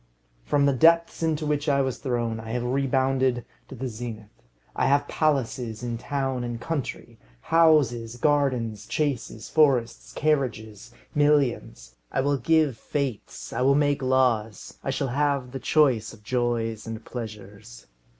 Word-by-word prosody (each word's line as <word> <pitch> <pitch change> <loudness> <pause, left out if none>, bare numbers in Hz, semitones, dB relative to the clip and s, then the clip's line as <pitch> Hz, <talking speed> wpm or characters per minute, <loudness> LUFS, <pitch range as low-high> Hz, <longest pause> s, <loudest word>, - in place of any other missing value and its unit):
From 140 - +2
the 140 - +3
depths 165 +6 +4
into 160 -1 0
which 150 0 0
I 140 -1 +3
was 130 -2 -3
thrown, 120 -4 -2
I 110 0 -8
have 125 -1 -1
rebounded 130 -1 +1 0.2
to - - -9
the 130 +3 -4
zenith. 110 -2 -7 0.4
I - - +1
have 140 +1 +2
palaces 125 -6 -1
in 120 -1 -3
town 135 -2 -2
and 120 -1 -4
country: 145 0 -5 0.2
houses, 135 - +3
gardens, 125 -6 0
chases, 125 -7 -2
forests, 130 -7 +2
carriages, 120 -9 -1 0.2
millions. 140 - +1 0.2
I - - +1
will 140 +1 +1
give 155 -4 +2
fêtes. 140 -6 -4
I - - -2
will 135 +2 +4
make 145 -1 +2
laws. 125 -5 0
I - - -3
shall 135 0 -1
have 140 -1 0
the 135 - -5
choice 130 -10 +2
of 105 -2 -16
joys 115 -2 -1
and 115 0 -7
pleasures. 100 - -9
130 Hz, 145 wpm, -25 LUFS, 115-145 Hz, 0.4 s, depths